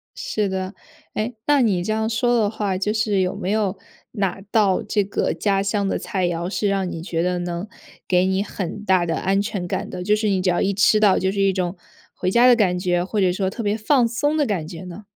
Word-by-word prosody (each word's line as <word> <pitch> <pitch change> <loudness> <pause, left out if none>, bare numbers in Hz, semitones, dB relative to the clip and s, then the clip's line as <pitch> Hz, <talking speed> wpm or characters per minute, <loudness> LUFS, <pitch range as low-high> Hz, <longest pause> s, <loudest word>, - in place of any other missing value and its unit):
是 210 -2 -2
的， 190 +1 -3 0.4
哎， 220 +3 -2
那 290 -2 +4
你 195 -7 +2
这 215 +4 -1
样 220 0 0
说 240 +1 +2
的 205 -2 +2
话， 205 -4 -2
就 210 +2 0
是 215 -3 +1
有 185 -1 0
没 185 - -4
有 210 -3 0 0.3
哪 195 -3 -2
道 200 -4 +3
这 205 -2 0
个 195 - -1
家 195 -2 +1
乡 200 0 0
的 - - 0
菜 185 -3 -1
肴， 175 +1 -2
是 205 0 -1
让 195 -2 0
你 160 - -5
觉 165 -2 -2
得 180 0 0
能 175 +3 -4 0.4
给 180 0 +3
你 190 +1 +1
很 200 0 -5
大 185 -3 +3
的 165 -1 -1
安 195 +1 +1
全 200 -4 -3
感 - - -3
的， 180 - -5
就 210 +3 +3
是 215 -1 0
你 190 -2 +1
只 180 - +1
要 175 - +1
一 200 0 +1
吃 210 +2 +4
到 205 -3 +4
就 190 +1 0
是 200 0 -1
一 195 -1 +3
种 180 0 -2 0.4
回 185 0 -1
家 240 +3 +5
的 245 - +7
感 185 -5 +2
觉， 175 -1 +1
或 200 +2 -1
者 180 -1 +3
说 190 +1 -1
特 230 - -6
别 210 0 0
放 240 +2 +3
松 290 +6 0
的 295 - +2
感 180 -9 -2
觉 170 +1 -8
呢？ 180 +3 -9
195 Hz, 265 characters per minute, -22 LUFS, 180-215 Hz, 0.4 s, 的